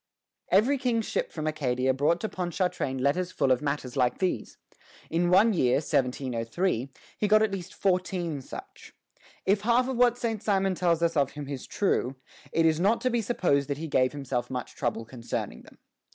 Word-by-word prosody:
Every 255 +8 +3
king's 235 -4 0
ship - - -2
from 155 -2 -5
Acadia 130 -4 0
brought 145 +6 +2
to 220 - -1
Ponchartrain 180 -7 -2
letters 145 +8 0
full 135 - +1
of 125 - +3
matters 140 -3 -3
like 125 -2 +2
these. 180 - -2 0.5
In 175 +1 +2
one 205 +5 +5
year, 125 -9 +3
1703, 130 +1 -1 0.3
he 210 - +2
got 215 +1 +5
at 220 - +1
least 185 -2 -6
fourteen 180 -5 -1
such. 390 - -11 0.5
If 200 +1 +3
half 240 +3 +3
of 260 -2 -2
what 245 -1 +4
Saint 225 -4 -2
Simon 195 -3 +1
tells 170 -2 +1
us 170 0 +1
of 140 -2 +1
him 145 -2 -7
is 140 -2 -6
true, 135 -9 0 0.4
it 165 - +2
is 160 -1 +3
not 205 +6 +3
to 255 - +1
be 235 0 +1
supposed 175 - +1
that 140 - -1
he 160 +2 -5
gave 130 -3 +2
himself 130 -4 -3
much 125 -2 -5
trouble 115 - -2
concerning 115 0 -5
them. - - -18
170 Hz, 185 wpm, -27 LUFS, 135-200 Hz, 0.5 s, one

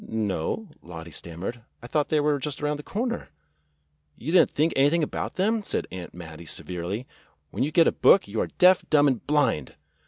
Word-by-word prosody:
"No," 110 - -2
Lottie 85 -1 -9
stammered. 85 - -6 0.2
"I - - -8
thought 145 +4 0
they 155 - +2
were 145 -1 +1
just 145 0 -4
around 150 0 -1
the - - -7
corner." 235 - -3 0.9
"You 150 - -4
did 180 - +7
n't - - +1
think 155 +2 +1
anything 145 +5 +3
about - - -3
them," 215 +4 +1
said - - -1
Aunt 90 -2 -7
Mattie 85 -1 -10
severely. 90 +9 -4 0.5
"When - - -4
you 140 - +2
get 165 +1 +5
a - - +4
book 195 - +5
you 105 +2 -2
are - - -1
deaf, 180 +1 +4
dumb, 145 -1 +5
and 130 -4 0
blind 140 - +1
140 Hz, 195 wpm, -26 LUFS, -, 0.9 s, did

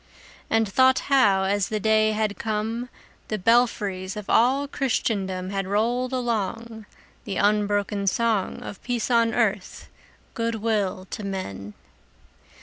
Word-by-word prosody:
And 225 -1 +2
thought 260 +6 +4 0.2
how, 200 -8 +4
as 200 +1 +1
the 215 - -1
day 215 0 +3
had 215 -1 -1
come, 225 +3 -2 0.4
The 215 - -2
belfries 205 -3 +1
of 210 - -5
all 265 +5 +3
Christendom 195 -9 -2
Had 195 -1 -2
rolled 240 +5 0
along 230 -2 -3 0.4
The 200 - -4
unbroken 205 -1 +1
song 220 -1 0
Of 200 - -8
peace 245 -1 -2
on 230 -1 +3
earth, 210 -5 -1 0.4
good 230 0 -2
will 205 -4 -1
to 215 - -5
men! 105 - -5
215 Hz, 130 wpm, -24 LUFS, 195-230 Hz, 0.4 s, thought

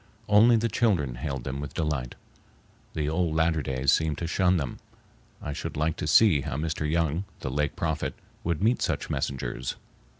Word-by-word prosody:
Only 110 +3 +6
the 115 +1 +2
children 100 - +1
hailed 65 0 -4
them 65 +2 -4
with 70 -2 -6
delight. 75 -7 -2 0.8
The 75 -2 -1
old 80 0 0
Latter 80 -1 +2
Days 65 0 +1
seemed 80 -3 +1
to 85 - -3
shun 90 +2 +2
them. 70 -6 -4 0.6
I 75 - -3
should - - -5
like 80 +1 +1
to - - -3
see 80 -1 +6
how 60 - -4
Mr. 75 0 -2
Young, 85 +2 0 0.2
the 65 - -3
Lake 75 +2 -1
Prophet, 80 -3 -2 0.3
would 85 +2 -1
meet 120 +3 +3
such - - -1
messengers. 65 -2 -3
75 Hz, 175 wpm, -27 LUFS, 70-85 Hz, 0.8 s, Only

